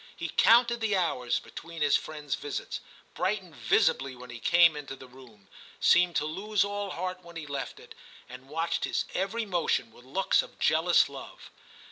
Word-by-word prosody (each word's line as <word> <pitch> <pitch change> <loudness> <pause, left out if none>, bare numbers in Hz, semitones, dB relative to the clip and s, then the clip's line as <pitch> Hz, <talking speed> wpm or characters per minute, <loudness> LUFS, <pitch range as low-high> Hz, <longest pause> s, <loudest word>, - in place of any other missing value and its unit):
He 170 - -5
counted 235 +6 +4
the 215 -2 +1
hours 125 -9 0
between 165 -2 -7
his 145 - +4
friend's 150 -3 -3
visits, 145 -1 -4 0.3
brightened 185 -3 -2
visibly 130 +3 +2
when 125 0 -11
he 120 - -8
came 170 +3 +5
into 140 -2 -7
the 130 - -12
room, 125 -6 -17 0.3
seemed 175 -1 +4
to 150 - +1
lose 195 +7 0
all 205 0 -3
heart 185 +1 -4
when 170 0 -13
he 160 -2 -6
left 140 -3 -5
it, - - -13 0.3
and 130 +2 -12
watched 165 +2 -1
his - - -1
every 205 +5 -1
motion 170 - 0
with 120 - -17
looks 185 +10 +2
of - - -13
jealous - - +4
love. - - -11
165 Hz, 175 wpm, -28 LUFS, 135-185 Hz, 0.3 s, came